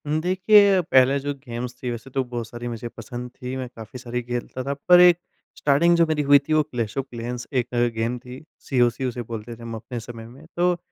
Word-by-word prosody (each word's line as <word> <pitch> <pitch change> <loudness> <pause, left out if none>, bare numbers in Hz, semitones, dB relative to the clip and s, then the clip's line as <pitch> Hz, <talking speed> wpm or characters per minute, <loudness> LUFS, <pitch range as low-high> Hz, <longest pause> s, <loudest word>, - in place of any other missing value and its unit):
हुँ, 155 +1 +1
देखिए 195 +2 +5
पहले 135 -4 +4
जो 145 +1 -3
गेम्स 125 -3 -7
थी 125 - -3
वैसे 120 +2 -7
तो 135 0 -1
बहुत 120 -2 -5
सारी 120 +1 -7
मुझे 120 0 -5
पसंद 120 +2 -8
थी, 125 +1 -6
मैं 130 -1 -4
काफ़ी 115 +2 -9
सारी 125 -1 -4
खेलता 120 +1 -4
था 140 +2 -2 0.2
पर 180 0 +9
एक 180 -1 +7 0.4
स्टार्टिंग 160 +5 +4
जो 170 - +5
मेरी 155 -1 0
हुई 145 0 +9
थी 155 - +1
वो 155 - +5
क्लैश 120 -7 -4
ऑफ 135 - -1
क्लैंस 120 +1 -5
एक 120 - -11 0.3
गेम 115 +2 -1
थी, 125 +3 -11 0.2
सीओसी 125 -1 +1
उसे 125 -1 -3
बोलते 115 0 -7
थे 115 - -16
हम 115 -1 -6
अपने 115 +2 -6
समय 115 0 -9
में 135 +6 -15
तो 175 0 +2
125 Hz, 225 wpm, -23 LUFS, 120-145 Hz, 0.4 s, पर